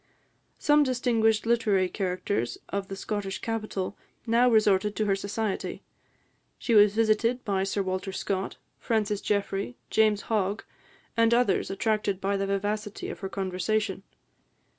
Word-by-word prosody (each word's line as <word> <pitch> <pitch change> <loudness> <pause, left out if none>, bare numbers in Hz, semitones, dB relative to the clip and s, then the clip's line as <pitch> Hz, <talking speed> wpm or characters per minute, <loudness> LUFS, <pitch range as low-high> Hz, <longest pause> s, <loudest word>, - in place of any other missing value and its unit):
Some 295 0 +4
distinguished 235 -5 +2
literary 215 -5 +2
characters 185 - -2
of 200 -1 -3
the 195 - -5
Scottish 195 -1 -3
capital 215 -4 -3 0.3
now 235 +2 +4
resorted 210 -2 +3
to 215 - 0
her 195 -1 +2
society. 200 +1 -3 0.7
She 235 - -1
was 210 -1 +6
visited 225 +2 +2
by 195 -3 +1
Sir 195 0 -1
Walter 185 +1 -3
Scott, 190 0 -3 0.2
Francis 210 -3 0
Jeffrey, 200 +2 -1
James 215 -1 +3
Hogg, 205 -1 -1 0.5
and 230 0 +4
others, 240 -6 +2
attracted 200 -1 0
by 195 +1 0
the 195 0 -1
vivacity 205 +1 -2
of - - -7
her 195 - -4
conversation. 190 +1 -1
205 Hz, 135 wpm, -27 LUFS, 195-225 Hz, 0.7 s, was